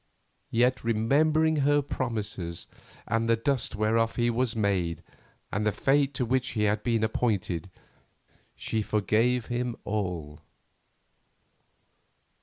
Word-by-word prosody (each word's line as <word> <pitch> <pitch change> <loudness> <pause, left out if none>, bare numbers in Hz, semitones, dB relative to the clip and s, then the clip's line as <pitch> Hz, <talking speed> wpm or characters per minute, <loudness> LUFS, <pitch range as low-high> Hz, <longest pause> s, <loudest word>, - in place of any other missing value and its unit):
Yet, 125 +3 +2
remembering 150 +8 +2
her 145 0 +3
promises, 105 -10 -4 0.4
and 115 0 0
the 115 - +5
dust 125 +1 -1
whereof 115 +2 +1
he 120 0 +2
was 120 0 0
made, 95 -6 0 0.5
and 105 - -1
the 105 - +2
fate 140 +3 +1
to 125 - 0
which 130 +2 0
he 105 - 0
had 105 0 +1
been 115 -2 0
appointed, 100 -5 -1 0.9
she 110 - -2
forgave 110 +4 +1
him 120 -1 -2
all. 90 -8 -3
115 Hz, 115 wpm, -28 LUFS, 105-125 Hz, 0.9 s, the